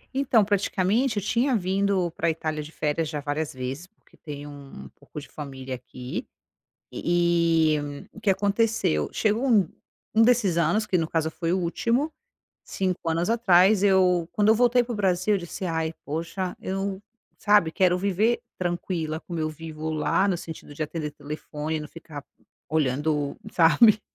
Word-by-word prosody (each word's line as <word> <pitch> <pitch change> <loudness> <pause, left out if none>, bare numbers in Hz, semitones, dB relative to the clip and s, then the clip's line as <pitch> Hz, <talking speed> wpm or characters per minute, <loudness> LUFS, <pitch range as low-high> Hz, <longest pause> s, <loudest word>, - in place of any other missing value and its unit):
Então 250 -6 +3
praticamente 205 +4 +1
eu 205 - -1
tinha 245 +5 +1
vindo 190 -2 +1
pra 170 0 -1
Itália 155 -1 -2
de 150 +1 -9
férias 155 0 -1
já 150 - -3
várias 145 +1 -2
vezes, 130 +6 -5
porque 220 - -28
tenho 145 -2 -8
um 140 - -11
pouco - - -10
de 145 - -11
família 135 -3 -7
aqui. 125 0 -6 0.7
E 170 -2 +2
e - - +1 0.3
o - - -12
que 210 - +2
aconteceu? 200 - +1
Chegou 220 +5 +1
um 205 -8 +4 0.5
um 220 - +6
desses 225 -7 +3
anos, 170 +6 +2
que 185 - +1
no 165 - 0
caso 160 -1 0
foi 165 +1 -2
o 185 - +2
último, 235 - 0 0.5
5 185 -3 -2
anos 165 +4 0
atrás 200 -3 +5
eu 185 -4 +3
quando 210 0 +3
eu 220 - +6
voltei 245 +1 +4
para 240 - -7
o - - -3
Brasil, 190 0 +2
eu - - +1
disse: 175 +2 -6
"Ai, 160 -2 -1
poxa, 170 +5 -3
eu 195 0 -3 0.4
sabe, 205 -6 +4
quero 180 0 +3
viver 200 +5 +1 0.2
tranquila, 175 -3 -2
como 170 -2 -6
eu 155 0 0
vivo 155 0 -6
lá, 155 +5 +1
no 190 - +1
sentido 160 -3 -9
de 155 - -2
atender 150 -1 -4
telefone 150 +1 -5
e - - -4
não 150 - -7
ficar 155 -3 -10 0.5
olhando, 150 0 0 0.2
sabe, 180 +7 +6
175 Hz, 170 wpm, -25 LUFS, 155-200 Hz, 0.7 s, um